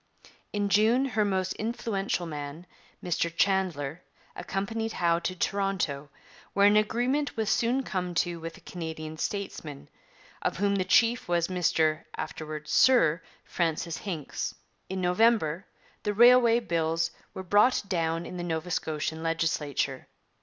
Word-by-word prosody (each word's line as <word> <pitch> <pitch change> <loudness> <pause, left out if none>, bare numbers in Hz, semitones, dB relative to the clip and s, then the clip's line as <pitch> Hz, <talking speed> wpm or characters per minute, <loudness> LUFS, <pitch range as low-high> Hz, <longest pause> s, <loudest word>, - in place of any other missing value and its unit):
In 205 -1 0
June 220 +6 +4
her 220 -5 +1
most 190 -2 0
influential 210 -5 -2
man, 150 +1 -6 0.4
Mr 170 -1 0
Chandler, 170 -4 0 0.3
accompanied 220 +3 -3
Howe 170 -1 +2
to 185 +2 -3
Toronto, 185 -8 -1 0.4
where 200 - +4
an 205 +1 +6
agreement 245 +7 +1
was 220 -2 0
soon 245 +3 +1
come 180 -6 -3
to 170 +1 0
with 165 0 -7
the - - -15
Canadian 160 -2 -6
statesmen, 160 -8 -5 0.5
of - - -1
whom 200 +1 +1
the 185 - 0
chief 240 +4 +3
was 170 0 +1
Mr 160 -4 +1
(afterwards 155 -1 -6
Sir) 170 -8 +5 0.2
Francis 165 -1 -1
Hincks. 170 -8 -4 0.3
In 190 0 -3
November 180 -2 +2 0.3
the 210 -1 -2
Railway 240 0 +7
Bills 165 -4 0 0.2
were 190 - -5
brought 205 +7 +4
down 165 -2 -1
in 180 - -7
the 175 - -4
Nova 165 0 -3
Scotian 160 0 -2
legislature. 155 -5 -1
180 Hz, 135 wpm, -28 LUFS, 160-210 Hz, 0.5 s, Railway